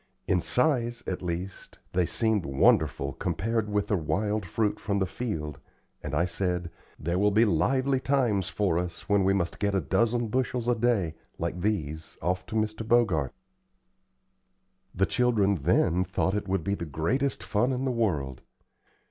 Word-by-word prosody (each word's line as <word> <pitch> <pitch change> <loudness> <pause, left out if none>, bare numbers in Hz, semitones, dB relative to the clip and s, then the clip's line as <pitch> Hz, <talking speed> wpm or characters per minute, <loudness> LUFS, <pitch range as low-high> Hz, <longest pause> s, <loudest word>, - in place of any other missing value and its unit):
In 90 - +2
size, 120 - +1
at 95 - -3
least, 90 +2 -5 0.2
they 90 -2 +2
seemed 110 -4 +1
wonderful 70 -1 +2
compared 110 +6 -1
with 105 -1 +1
the 105 - 0
wild 105 +4 -1
fruit 105 +4 0
from 100 0 -1
the 95 - +2
field, 90 - -4 0.4
and 75 -1 -4
I 85 +4 +3
said: 90 -1 -2 0.3
"There 85 +4 -1
will 105 +1 +4
be 110 +3 +4
lively 130 - +2
times 125 -9 +1
for 95 -5 +1
us 90 -1 -5
when 100 -1 +3
we 95 +1 +3
must 85 -3 -2
get 100 -1 0
a - - +3
dozen 115 - +1
bushels 125 0 -1
a 120 - +4
day, 110 -8 +1 0.2
like 85 +1 -3
these, 80 -7 -2
off 90 +1 -2
to - - -6
Mr. 110 0 -1
Bogart." 105 - +2 1.6
The 95 - +3
children, 115 -5 +2
then, 90 +3 +3
thought 95 +1 -1
it 105 -1 -2
would 95 -3 0
be 100 - 0
the 85 - -3
greatest 120 - -1
fun 120 +5 +1
in 130 +1 -1
the 130 - +1
world. 75 - -1
100 Hz, 165 wpm, -28 LUFS, 85-115 Hz, 1.6 s, will